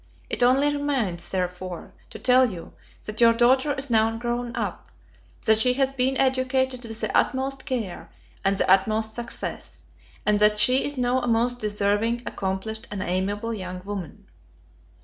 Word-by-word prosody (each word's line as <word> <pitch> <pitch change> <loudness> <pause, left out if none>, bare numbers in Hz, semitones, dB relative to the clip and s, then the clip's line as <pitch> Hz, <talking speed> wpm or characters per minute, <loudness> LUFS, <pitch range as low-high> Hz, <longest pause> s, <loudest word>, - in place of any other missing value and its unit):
It - - -1
only 270 +4 +4
remains, 245 -12 -2
therefore, 180 -1 -4 0.2
to - - -9
tell 255 0 +4
you, 175 -5 -9 0.3
that 215 +2 -4
your 230 0 +7
daughter 260 +5 +3
is 270 -1 -5
now 225 0 +2
grown 240 +1 -3
up; - - -4 0.6
that 220 0 +5
she 250 +3 +4
has 270 0 +1
been 265 0 +1
educated 260 -1 +1
with 225 -1 -5
the - - -2
utmost 265 0 0
care, 225 -9 -4 0.3
and 195 0 +2
the - - +1
utmost 215 +3 +2
success; 235 0 -5 0.4
and 210 -1 +3
that 210 0 +4
she 255 +5 +4
is 285 -1 -2
now 250 +1 +1
a 245 - -3
most 240 +1 +1
deserving, 210 +3 0
accomplished, 200 +4 -4
and 200 -2 -4
amiable 205 +5 -2
young 185 -3 -6
woman. 195 -6 -7
230 Hz, 160 wpm, -24 LUFS, 205-255 Hz, 0.6 s, your